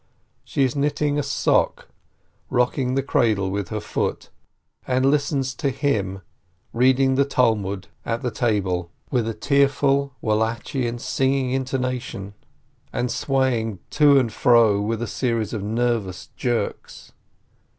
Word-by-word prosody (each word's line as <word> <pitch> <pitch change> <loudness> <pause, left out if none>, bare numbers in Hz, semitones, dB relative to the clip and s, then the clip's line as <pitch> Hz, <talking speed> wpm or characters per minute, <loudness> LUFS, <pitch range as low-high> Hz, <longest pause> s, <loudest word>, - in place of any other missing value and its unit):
She 140 - 0
is 130 0 0
knitting 145 0 0
a - - +2
sock, 140 0 +1 0.6
rocking 125 +1 +1
the 135 - +1
cradle 105 -7 +1
with 100 -2 -3
her - - -3
foot, - - -3 0.6
and 130 0 +2
listens 140 -2 +1
to 140 +2 -1
him 105 -9 -1 0.5
reading 130 +2 +3
the 135 +1 +3
Talmud 105 -8 0 0.2
at 115 +3 -3
the 125 - -1
table, 95 -7 0 0.2
with 120 -5 +1
a 115 - -3
tearful, 140 +2 +2
Wallachian, 115 +3 -1
sing - - -6
56 - - -4
PEREZ 135 0 +4
ing 135 -2 0
intonation, 125 -6 -3 0.6
and 125 0 -1
swaying 125 -6 0
to 145 -2 +5
and 120 -5 +1
fro 115 -4 +4
with 115 +2 -2
a - - -1
series 115 -4 -1
of 110 - -3
nervous 110 -3 -1
jerks. 120 -2 -3
125 Hz, 140 wpm, -23 LUFS, 110-135 Hz, 0.6 s, to